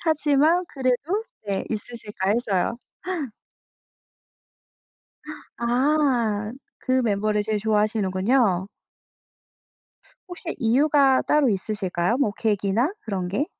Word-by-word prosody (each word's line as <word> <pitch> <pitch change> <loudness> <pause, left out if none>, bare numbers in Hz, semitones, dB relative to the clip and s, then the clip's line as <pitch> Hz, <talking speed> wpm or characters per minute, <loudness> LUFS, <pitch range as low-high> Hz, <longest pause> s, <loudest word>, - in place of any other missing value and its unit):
하지만 315 +2 +2
그래도 275 - -1 0.2
네 195 -1 -2
'있으실까?' 210 -3 -3
해서요. 230 0 0 2.8
아 240 -4 +1 0.3
그 260 0 +1
멤버를 210 -1 +1
제일 215 0 -1
좋아하시는군요. 210 -1 +1 1.6
혹시 355 -1 -6
이유가 270 +3 +3
따로 295 -4 +3
있으실까요? 195 0 -1
뭐 215 -7 +2
계기나 215 - 0
그런 190 -5 -3
게? 260 - -1
230 Hz, 205 characters per minute, -24 LUFS, 205-275 Hz, 2.8 s, 이유가